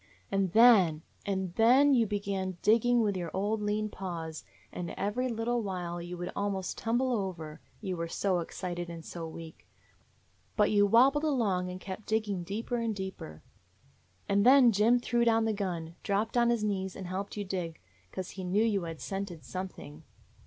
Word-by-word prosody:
"And 195 Hz, -2 st, +1 dB
then 195 Hz, -10 st, +6 dB
— -, -, -33 dB
and 190 Hz, -3 st, -2 dB
then 255 Hz, +7 st, +5 dB
you 235 Hz, -4 st, +3 dB
began 195 Hz, -3 st, -3 dB
digging 235 Hz, +2 st, +4 dB
with 205 Hz, -3 st, +1 dB
your 175 Hz, -2 st, -3 dB
old 210 Hz, +3 st, 0 dB
lean 210 Hz, +1 st, 0 dB
paws, 170 Hz, -6 st, -6 dB, 0.3 s
and 175 Hz, -1 st, -4 dB
every 250 Hz, +6 st, -1 dB
little 235 Hz, +1 st, -1 dB
while 175 Hz, -4 st, -4 dB
you 175 Hz, +1 st, -6 dB
would 175 Hz, +1 st, -4 dB
almost 195 Hz, -2 st, -2 dB
tumble 240 Hz, +3 st, 0 dB
over, 180 Hz, -8 st, -4 dB, 0.2 s
you 190 Hz, -4 st, -3 dB
were 170 Hz, -1 st, -3 dB
so 185 Hz, +2 st, 0 dB
ex 170 Hz, -, -7 dB
cited 175 Hz, -2 st, -4 dB
and 165 Hz, -1 st, -8 dB
so 165 Hz, -2 st, -6 dB
weak. 160 Hz, 0 st, -10 dB, 0.9 s
But 210 Hz, -1 st, +4 dB
you 205 Hz, -1 st, +4 dB
wabbled 265 Hz, +7 st, +5 dB
along 210 Hz, -12 st, +1 dB
and 180 Hz, 0 st, -6 dB
kept 190 Hz, +3 st, -8 dB
digging 215 Hz, -4 st, 0 dB
deeper 215 Hz, +7 st, -3 dB
and 230 Hz, -2 st, -1 dB
deeper. 190 Hz, -, -7 dB, 0.8 s
"And 200 Hz, 0 st, +3 dB
then 255 Hz, 0 st, +7 dB
Jim 220 Hz, +4 st, +4 dB
threw 240 Hz, 0 st, +1 dB
down 225 Hz, -1 st, +3 dB
the 220 Hz, -, +1 dB
gun, 175 Hz, -5 st, -3 dB
dropped 205 Hz, +3 st, -1 dB
on 235 Hz, -1 st, +4 dB
his 235 Hz, -3 st, +1 dB
knees, 190 Hz, -3 st, -2 dB
and 190 Hz, -, -7 dB
helped 190 Hz, +4 st, -5 dB
you 205 Hz, -, -2 dB
dig; 180 Hz, -4 st, -4 dB, 0.3 s
'cause 185 Hz, -1 st, -5 dB
he 190 Hz, -, -7 dB
knew 190 Hz, +4 st, +2 dB
you 205 Hz, -6 st, +1 dB
had 165 Hz, -2 st, -7 dB
scented 195 Hz, -5 st, -5 dB
something. 185 Hz, -5 st, -7 dB
195 Hz, 180 wpm, -30 LUFS, 180-225 Hz, 0.9 s, then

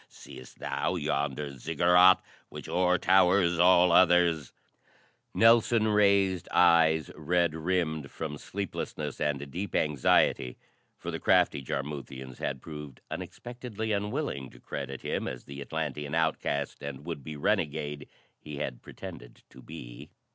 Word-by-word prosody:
Seest 65 Hz, -, -13 dB
thou -, -, -2 dB
yonder 70 Hz, 0 st, -2 dB
Ziggurat 90 Hz, +6 st, +5 dB, 0.3 s
which -, -, -9 dB
o'er 90 Hz, 0 st, +2 dB
towers 90 Hz, -2 st, +3 dB
all 90 Hz, 0 st, +6 dB
others?" 85 Hz, -5 st, +4 dB, 0.8 s
Nelson 115 Hz, -1 st, +4 dB
raised 100 Hz, -4 st, +3 dB
eyes 80 Hz, -3 st, +4 dB
red 85 Hz, +1 st, +1 dB
rimmed 80 Hz, -3 st, -1 dB
from 75 Hz, -3 st, -6 dB
sleeplessness 85 Hz, -6 st, -5 dB
and 70 Hz, -1 st, -2 dB
deep 95 Hz, +3 st, -5 dB
anxiety 70 Hz, -3 st, +2 dB, 0.4 s
for -, -, -6 dB
the -, -, -4 dB
crafty -, -, +3 dB
Jarmuthians 65 Hz, -1 st, -6 dB
had 70 Hz, -2 st, -4 dB
proved 75 Hz, -4 st, -9 dB
unexpectedly 120 Hz, -3 st, -6 dB
unwilling 105 Hz, -, -2 dB
to -, -, -17 dB
credit 70 Hz, -1 st, -6 dB
him -, -, -2 dB
as 60 Hz, -, -6 dB
the 70 Hz, 0 st, -9 dB
Atlantean 75 Hz, -1 st, -4 dB
outcast 80 Hz, -3 st, -1 dB
and 70 Hz, 0 st, -7 dB
would 80 Hz, -5 st, -5 dB
be 75 Hz, +2 st, -7 dB
renegade 75 Hz, 0 st, -1 dB, 0.3 s
he 75 Hz, -1 st, -8 dB
had 65 Hz, -4 st, -4 dB
pretended -, -, -11 dB
to 65 Hz, -, -14 dB
be. -, -, -10 dB
80 Hz, 125 wpm, -29 LUFS, 70-90 Hz, 0.8 s, all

